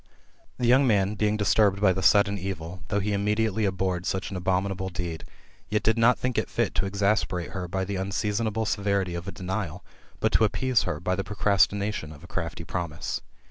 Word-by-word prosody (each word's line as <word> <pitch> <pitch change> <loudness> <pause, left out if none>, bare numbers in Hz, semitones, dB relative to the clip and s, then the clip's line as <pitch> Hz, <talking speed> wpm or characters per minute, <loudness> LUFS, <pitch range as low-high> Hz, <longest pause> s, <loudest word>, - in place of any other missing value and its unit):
'' - - -35
The 125 - -1
young 130 +3 +5
man 100 -3 +2
being 105 0 +1
disturbed 105 -1 +3
by 100 -2 +4
the 95 - -3
sudden 100 +2 +4
evil, 90 -2 -5
though 100 - 0
he 105 +1 -1
immediately 105 +1 +1
abhorred 95 -2 -1
such 95 +1 -2
an - - -4
abominable 95 +1 -1
deed, 85 -3 -5 0.4
yet 105 0 0
did 110 - +3
not 115 +2 +4
think 125 -2 0
it - - -3
fit - - 0
to 95 +5 0
exasperate 100 -3 0
her 90 -2 -4
by 95 +2 -2
the 100 0 -3
unseasonable 105 +3 -1
severity 100 -3 0
of 85 +2 -5
a - - -3
denial 90 -1 -4 0.3
but - - +1
to - - +4
appease 125 +3 +2
her 80 -4 -3
by 90 +1 -1
the 95 - -2
procrastination 100 -3 +1
of 75 +1 -13
a - - -11
crafty 85 -2 -4
promise. 85 -2 -4
100 Hz, 200 wpm, -26 LUFS, 90-105 Hz, 0.4 s, young